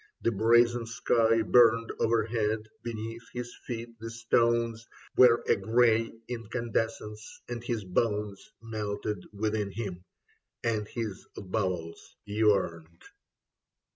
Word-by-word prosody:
The 115 - +3
brazen 115 +2 +4
sky 115 0 +2
Burned 115 -1 +5
overhead. 110 -1 +1
Beneath 115 0 -5
his 120 0 -5
feet 115 -1 -6
the 115 +1 -6
stones 115 0 +1 0.3
Were 120 -2 +6
a - - +5
grey 115 +2 +3 0.2
incandescence, 115 -2 -3
and 120 -1 -5
his 120 -3 -2
bones 105 +1 -1
Melted 105 -3 -3
within 105 0 -1
him, 95 -4 -5 0.6
and 110 -3 0
his 110 -5 -5
bowels 90 -4 -3
yearned. 95 -6 0
115 Hz, 105 wpm, -29 LUFS, 105-115 Hz, 0.6 s, Were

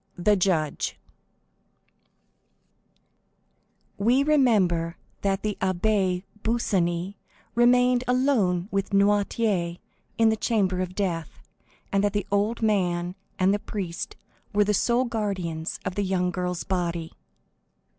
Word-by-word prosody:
The 205 +4 +3
Judge 175 -6 0 3.0
We 245 +7 +3
remember 200 - +2 0.2
that 195 -1 0
the 210 -1 -2
Abbé 185 -1 +1 0.2
Busoni 190 -5 0 0.4
remained 245 +1 +4
alone 240 -9 +2
with 195 0 -2
Noirtier 200 -3 +1 0.4
in 225 -1 +5
the 220 - +2
chamber 200 -5 0
of 185 0 -4
death, 170 -6 -3 0.5
and 195 0 +2
that 205 - +1
the 205 - -1
old 210 +3 0
man 180 -4 +1 0.2
and 190 +1 +3
the 205 - 0
priest 185 -5 -5 0.4
were 205 0 +4
the 210 +1 +1
sole 240 +5 +2
guardians 185 -8 -3
of 185 - -2
the 205 - -1
young 185 -2 0
girl's 180 -1 -3
body. 170 -3 -2
195 Hz, 115 wpm, -25 LUFS, 180-220 Hz, 3.0 s, in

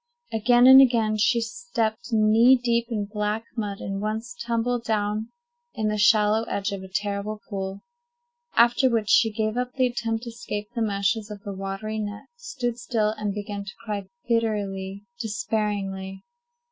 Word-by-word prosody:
Again 240 +3 +4
and 265 +1 +10
again 225 -4 +3
she 235 +2 +3
stepped 240 - -3
knee 225 +3 +6
deep 235 -2 0
in 210 -3 -2
black 210 +2 -2
mud, 205 -4 -3
and 195 0 -4
once 220 +3 -3
tumbled 235 +1 -1
down 215 0 -1 0.5
in 215 -1 0
the 210 - -1
shallow 210 0 +4
edge 200 -1 -2
of 200 -1 -4
a 190 - -9
terrible 205 +2 -3
pool; 195 -1 -5 0.7
after 240 +3 +5
which 225 -3 0
she 225 - +5
gave 215 +1 -1
up 250 0 -2
the 260 -1 +3
attempt 230 -2 -2
to 235 - -6
escape 210 -3 -5
the 235 - -2
meshes 205 0 0
of 205 -1 -9
the 200 -2 -5
watery 195 +3 -4
net, 205 0 -5
stood 255 - -4
still, 225 -3 0
and 210 -2 -3
began 205 -1 -5
to 200 - -9
cry 205 -3 -4 0.2
bitterly, 200 -4 -1
despairingly. 205 -4 -3
215 Hz, 160 wpm, -25 LUFS, 205-235 Hz, 0.7 s, and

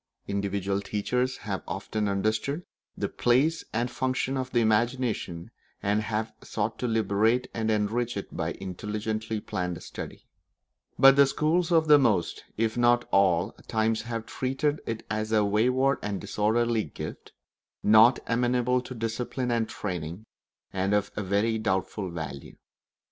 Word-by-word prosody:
Individual 100 0 -1
teachers 125 +6 -1
have 100 -3 -4
often 105 +4 -2
understood 110 - -1 0.3
the - - -1
place 140 +7 +2
and 120 +2 -1
function 130 +1 -1
of 130 -1 -2
the 120 - +3
imagination, 110 -6 0 0.3
and 105 +1 +2
have 110 0 -2
sought 110 +1 -3
to 125 - -1
liberate 115 +2 +2
and 110 -1 -1
enrich 110 +2 0
it 100 - -6
by 80 0 -2
intelligently 105 +3 -4
planned 90 -4 -4
study; - - -8 0.7
but 135 0 +8
the 140 0 +6
schools 160 +5 +1
of 160 -2 +4
most, 105 -10 +1
if 110 0 0
not 120 0 +4
of - - -25
all, 95 0 +3 0.2
times 110 0 +1
have 115 0 -4
treated 135 +3 -1
it 115 -1 -4
as 110 0 -2
a 105 -2 +4
wayward 125 +7 +2
and 100 -2 -3
disorderly 115 +1 +1
gift, 75 - -8 0.5
not 110 +4 +7
amenable 125 +1 +1
to 130 0 -8
discipline 120 +2 -2
and 115 -2 0
training, 90 0 -5 0.5
and 95 +1 +1
of 100 -1 0
very 105 +3 0
doubtful 95 -1 -1
value. 80 -5 -7
110 Hz, 140 wpm, -27 LUFS, 100-120 Hz, 0.7 s, but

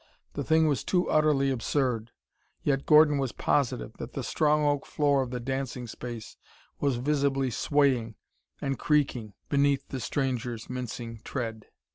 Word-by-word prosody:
The - - -3
thing 160 0 +4
was 145 -3 0
too 180 -1 +1
utterly 150 -3 +3
absurd 125 -2 0 0.5
yet 140 -1 0
Gordon 150 -2 +6
was 135 -3 -1
positive 140 -5 0
that - - -7
the - - -3
strong 150 0 +2
oak 145 -1 +1
floor 145 -2 +2
of 130 - -3
the 125 0 -4
dancing 130 0 -3
space 120 -1 -8 0.4
was 140 -3 +1
visibly 135 0 +1
swaying 130 -4 +1 0.4
and 135 -2 -2
creaking 135 -8 +1
beneath 140 -1 +2
the 130 - -4
stranger's 125 -3 -2
mincing 120 -2 -5
tread! 115 -5 -4
135 Hz, 145 wpm, -28 LUFS, 120-145 Hz, 0.5 s, Gordon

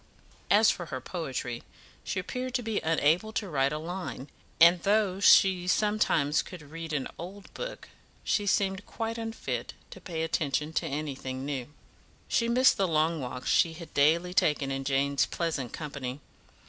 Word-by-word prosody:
As 210 +1 +6
for 175 -3 -6
her 130 -3 -4
poetry, 130 -6 -4 0.4
she - - -2
appeared 255 +6 -4
to 245 - 0
be 220 -2 -1
unable 165 +6 +2
to 215 -2 -2
write 140 -4 +1
a 150 - -2
line, 165 -4 -6 0.3
and 170 +1 +7
though 200 -1 +2
she 190 -2 +5
sometimes 180 -7 +2
could 180 -4 -10
read 165 0 -6
an 145 -4 -1
old 190 +3 -9
book, - - -6 0.4
she 205 -1 0
seemed 195 0 +1
quite 225 0 -4
unfit 225 0 -4 0.2
to - - -11
pay 165 -4 -4
attention 150 -1 -1
to 165 - 0
anything 135 -3 -4
new. 135 -4 -3 0.6
She 230 0 +1
missed 255 +2 +5
the 195 - +2
long 160 0 +1
walks 125 0 -3
she 165 - +3
had 165 0 -11
daily 165 +5 +3
taken 150 -5 +2
in 135 0 -3
Jane's 140 0 +1
pleasant 155 -8 -2
company. 140 -4 -5
165 Hz, 160 wpm, -29 LUFS, 140-195 Hz, 0.6 s, and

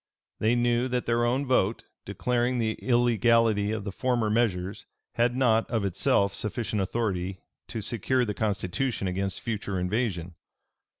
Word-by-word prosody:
They 110 +3 +2
knew 120 +1 +2
that 125 -1 -1
their 120 0 +2
own 130 +4 +1
vote, 115 -5 +1 0.2
declaring 125 0 0
the 110 -2 +1
illegality 115 -3 +3
of 110 -2 -3
the 100 - -4
former 120 0 0
measures, 100 -5 -1 0.3
had 120 +1 +1
not, 115 -4 +2
of 115 -4 0
itself, 100 +1 +2
sufficient 105 +1 -2
authority 95 -3 -2 0.3
to 115 - -5
secure 125 +4 0
the 105 - -2
constitution 105 +2 -1
against 95 +1 -2
future 100 -4 -3
invasion. 90 -3 -1
110 Hz, 140 wpm, -27 LUFS, 100-120 Hz, 0.3 s, illegality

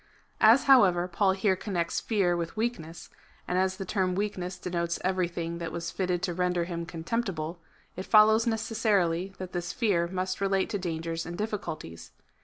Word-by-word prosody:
^ - - -33 0.4
As, 225 +5 +6
however, 190 -10 +5
Paul 190 +2 +2
here 190 0 +1
connects 180 -3 -2
fear 195 -6 +1
with 170 +4 -4
weakness, 215 -8 -4 0.4
and 180 - +1
as 190 0 0
the 195 - -5
term 185 -2 0
weakness 185 -3 -3
denotes 170 -1 -2
everything 175 -2 -1
that 165 -1 -4
was 170 0 -4
fitted 180 -2 -1
to 180 - -1
render 180 0 0
him 170 -1 -5
contemptible, 170 -2 -3 0.4
it 185 - -6
follows 220 +1 +6
necessarily 200 -5 0
that 185 -1 -7
this 175 -1 -3
fear 195 -8 +1
must 185 +1 -3
relate 195 -1 +1
to 205 - -1
dangers 165 -2 -3
and 175 0 -6
difficulties. 175 - -5
185 Hz, 170 wpm, -28 LUFS, 170-200 Hz, 0.4 s, As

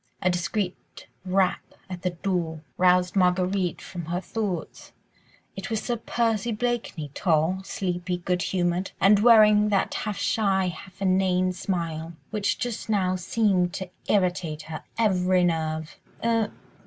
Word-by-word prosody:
A 185 - +3
discreet 180 +2 -3 0.2
rap 185 0 +2 0.3
at 180 -2 -7
the 180 - 0
door 170 -3 -2
roused 180 0 +3
Marguerite 180 -1 +1
from 175 -3 -7
her 175 +2 -2
thoughts. 190 -2 -4 0.6
It - - -6
was 220 -2 0
Sir 240 - -2
Percy 230 -1 0
Blakeney, 220 - -2
tall, 165 +4 +1
sleepy, 180 -1 -2
good 180 0 -1
humoured, 180 +1 -1
and 200 +1 +6
wearing 210 -2 +6
that 200 -2 +1
half 210 -2 -3
shy, 195 -4 +1
half 190 +2 -9
inane 185 -1 +2
smile, 170 -3 -3 0.2
which 205 -2 0
just 245 -3 -4
now 185 -3 +2
seemed 185 -1 +1
to 190 -2 -5 0.2
irritate 180 -6 0
her 155 -1 -7
every 185 -4 +3
nerve. 160 -2 -1 0.3
"Er 230 -2 +2
185 Hz, 135 wpm, -26 LUFS, 175-205 Hz, 0.6 s, and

